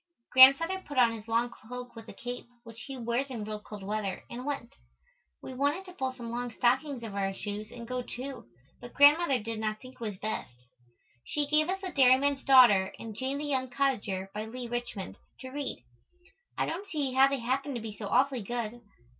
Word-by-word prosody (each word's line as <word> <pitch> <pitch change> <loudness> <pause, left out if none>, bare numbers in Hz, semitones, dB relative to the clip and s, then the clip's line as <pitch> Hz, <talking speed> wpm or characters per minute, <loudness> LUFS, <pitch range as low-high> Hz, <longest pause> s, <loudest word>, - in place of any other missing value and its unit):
Grandfather 275 +8 +7
put 285 -6 -9
on 240 -2 +6
his 225 -1 -8
long 230 +1 +2
cloak 245 +2 -9
with 225 0 -10
a - - -8
cape, 245 0 -7 0.2
which 230 0 -11
he 270 -1 -6
wears 240 +3 -1
in 235 -5 -5
real 215 0 -5
cold 210 -2 -9
weather, 205 -1 -3
and 245 +2 -6
went. 275 -5 -4 0.7
We 260 - -7
wanted 285 +8 0
to 365 - -11
pull 265 -6 -2
some 235 -3 -8
long 245 0 -3
stockings 255 +1 +1
over 200 -3 -4
our 195 0 -1
shoes 210 +2 -6
and 235 -1 -9
go 255 0 -2
too 255 - -7 0.3
but 240 0 -11
Grandmother 290 0 +6
did 225 0 -5
not 215 0 -2
think 255 0 -12
it - - -22
was 210 -4 -4
best. 205 - -4 0.7
She 295 -1 -1
gave 305 +3 +2
us 385 +1 -2
the 375 -2 -4
"Dairyman's 270 0 +4
Daughter" 240 -8 +6
and 225 -1 -7
"Jane 265 +4 -2
the 295 - -4
Young 260 -3 -1
Cottager," 205 -8 -1
by 215 +1 -4
Leigh 245 +2 -6
Richmond, 240 -5 -5 0.2
to 260 - -7
read. 285 0 -5 0.7
I - - +1
don't 375 +5 -4
see 290 -7 -2
how 265 +1 +6
they 275 0 -1
happened 265 +3 -2
to - - -2
be 215 -2 -7
so 205 -1 -6
awfully 260 +3 +2
good. 240 +2 -4
245 Hz, 205 wpm, -30 LUFS, 225-275 Hz, 0.7 s, Grandfather